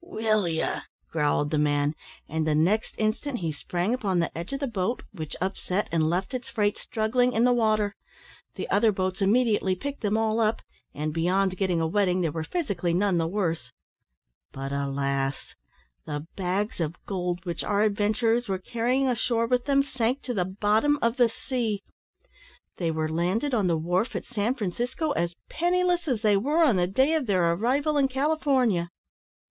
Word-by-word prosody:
"Will 220 - 0
ye!" 160 -1 0 0.5
growled 150 -2 +1
the 155 - +1
man; 145 0 +2 0.3
and 160 0 -1
the 155 - +2
next 185 +8 +1
instant 225 +5 -1
he 165 -7 -2
sprang 175 +7 -2
upon 205 -8 0
the 170 - 0
edge 170 +7 -5
of 275 - -2
the 280 - -1
boat, 225 -1 -2
which 160 -6 -6
upset, 190 +1 -2
and 160 -1 +2
left 185 +7 -1
its 255 -1 -4
freight 205 -2 0
struggling 245 +2 +1
in 225 - +2
the 250 0 +5
water. 215 -3 +1 0.6
The - - -4
other 225 -2 +4
boats 185 0 -2
immediately 210 -2 +3
picked 285 +8 -5
them 210 0 +1
all 220 0 +1
up; 220 0 +1 0.3
and, 150 +1 -2
beyond 185 +4 +1
a 175 -4 +1
wetting, 185 +1 +1
they 165 -3 0
were 160 +1 -3
physically 185 - -1
none 190 -2 +2
the 165 - +1
worse. 165 - -2 0.8
But, 135 0 -5
alas! 140 -1 -2 0.5
the 145 0 -4
bags 195 +3 -1
of 165 0 -1
gold 180 -2 -3
which 170 -1 -3
our 205 +1 +1
adventurers 220 +3 +1
were 190 -1 0
carrying 245 +7 0
ashore 235 -1 +1
with 245 +1 +1
them, 275 -1 +3
sank 255 -1 -1
to 245 - -3
the 185 -5 0
bottom 210 +9 +2
of 235 +2 +1
the 240 -2 +5
sea! 225 -4 -3 0.9
They 170 -3 0
were 160 -1 -1
landed 180 - 0
on 210 -6 +2
the 170 -2 +2
wharf 180 +8 0
at - - -3
San 235 +1 -1
Francisco 245 - -2
as 170 -6 -1
penniless 355 0 +1
as 240 -6 -1
they 210 -2 +4
were 295 +10 +2
on 250 -11 +4
the 175 0 +2
day 265 - +2
of 310 -6 0
their 180 -4 +3
arrival 275 - +1
in 275 -1 +4
California. 265 - +1
205 Hz, 180 wpm, -26 LUFS, 170-245 Hz, 0.9 s, the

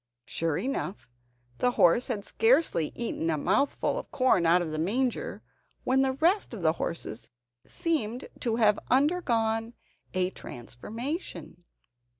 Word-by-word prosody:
Sure 165 -2 -1
enough, 245 - -3 0.5
the 250 0 +2
horse 180 +7 +4
had 210 -5 -3
scarcely 330 - +2
eaten 225 -8 -2
a 155 - +1
mouthful 275 - +1
of - - -9
corn 255 - +3
out 170 +2 +5
of 170 -3 -3
the 155 - -3
manger, 235 +8 -1 0.4
when 265 +1 +3
the 265 -1 +2
rest 335 - +1
of 190 - -7
the 160 -1 +4
horses 120 -9 -4 0.4
seemed 265 -7 -2
to 230 -2 0
have 215 -3 +4
undergone 235 -6 +1 0.4
a 185 0 +1
transformation. 220 - -6
225 Hz, 135 wpm, -28 LUFS, 175-265 Hz, 0.5 s, out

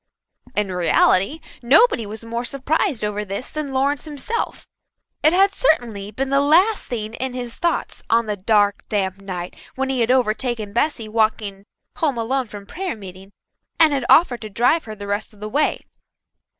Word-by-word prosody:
In 205 -2 0
reality 185 - +2 0.2
nobody 255 - +4
was 220 +2 -8
more 235 +1 -3
surprised 275 - -1
over 210 0 -2
this 200 +5 -6
than 305 -3 -4
Lawrence 270 0 0
himself. 305 - -4 0.6
It 310 - +5
had 390 +3 +4
certainly 230 - 0
been 265 +6 -3
the 275 0 +4
last 360 +9 +3
thing 220 -3 -4
in 260 +1 -3
his 245 -2 -5
thoughts 345 - -2
on 230 0 +3
the 210 -1 -2
dark, 205 0 +2
damp 195 -2 -1
night 180 -2 -6 0.2
when 265 0 -1
he 265 -1 -1
had 230 0 +1
overtaken 235 -3 0
Bessy 240 -2 0
walking 215 -2 -1 0.3
home 290 -6 0
alone 250 +3 -1
from 205 -2 -10
prayer 365 - -4
meeting 190 -1 -11 0.5
and 315 -2 +6
had 270 -3 -1
offered 260 -8 +5
to 215 - -6
drive 245 +10 +2
her 215 -1 -7
the 205 -1 -8
rest 205 +2 -3
of - - -20
the 210 - -5
way. 290 +8 0
235 Hz, 175 wpm, -21 LUFS, 210-280 Hz, 0.6 s, and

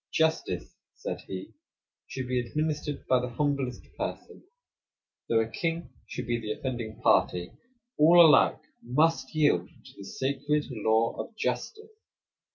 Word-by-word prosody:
"Justice," 160 - 0 0.2
said - - -5
he, 95 -1 -7 0.5
"should 130 -1 -5
be 125 0 0
administered 150 +3 -2
to - - -29
the 125 0 -3
humblest 140 -4 -1 0.2
person; - - -5 0.9
though 115 -1 +4
a 110 - -1
king 165 +8 -3 0.2
should - - -5
be 120 0 -1
the 110 -2 -3
offending 120 -4 -5
party, 90 +3 +2 0.5
all 165 +3 +7
alike 160 -3 +6 0.2
must 150 +2 +1
yield 145 - +3
to - - -18
the 100 - -10
sacred 140 +6 -1
law 110 0 +1
of 225 - -6
justice. 440 - -3
130 Hz, 135 wpm, -28 LUFS, 115-155 Hz, 0.9 s, all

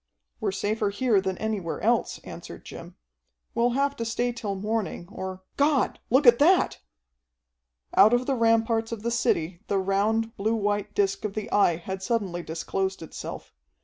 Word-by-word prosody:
"We're - - 0
safer 205 +2 -1
here 205 0 +2
than 190 -1 -2
anywhere 210 -6 -3
else," - - +1
answered - - -10
Jim. - - -10 0.6
"We'll 235 +1 +2
have 280 0 +1
to 230 - -2
stay 240 +2 -1
till 225 -4 -4
morning, 210 -3 -3
or 190 -1 -6
God, 285 -1 +2
look 265 +4 +4
at 235 -1 +8
that!" 350 +6 +4 1.1
Out 210 - +7
of 245 +1 +2
the 275 - +1
ramparts 225 -1 +2
of 225 -2 -5
the 235 - -1
city 180 -7 0
the 200 - +1
round, 215 +4 0
blue 220 +3 +1
white 205 -1 -1
disc 195 -1 +1
of 210 -2 -3
the 215 -1 -4
Eye 200 -5 +4
had 190 +3 -6
suddenly 190 -4 -1
disclosed 190 +3 -3
itself. 160 - -8
215 Hz, 165 wpm, -26 LUFS, 190-230 Hz, 1.1 s, at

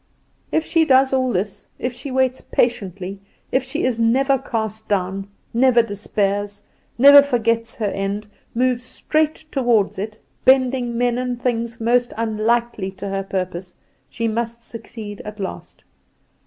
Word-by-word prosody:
"If 320 - +1
she 330 -1 +3
does 265 -2 +4
all 255 -1 +2
this 190 +1 -3
if 250 - -3
she 245 +3 -7
waits 260 0 +1
patiently, 195 -4 -1 0.3
if 260 - +3
she 265 - -3
is 245 -3 0
never 265 +4 +3
cast 220 -4 -4
down, 195 0 -1 0.3
never 240 0 +5
despairs, 205 -1 -2 0.3
never 280 +3 +10
forgets 230 -4 0
her 220 - -2
end, 200 +1 -2 0.3
moves 250 0 +1
straight 310 +5 -1
toward 235 -8 +2
it, 215 +2 -5 0.2
bending 255 -2 +3
men 245 0 +1
and 250 -1 -2
things 235 -2 -2
most 240 +2 +2
unlikely 225 -2 0
to 195 +1 -6
her 195 0 -1
purpose 185 -2 -4 0.3
she 230 - -2
must 235 +1 -3
succeed 220 -3 -8
at 210 0 -8
last. 195 - -7
230 Hz, 140 wpm, -21 LUFS, 205-255 Hz, 0.3 s, never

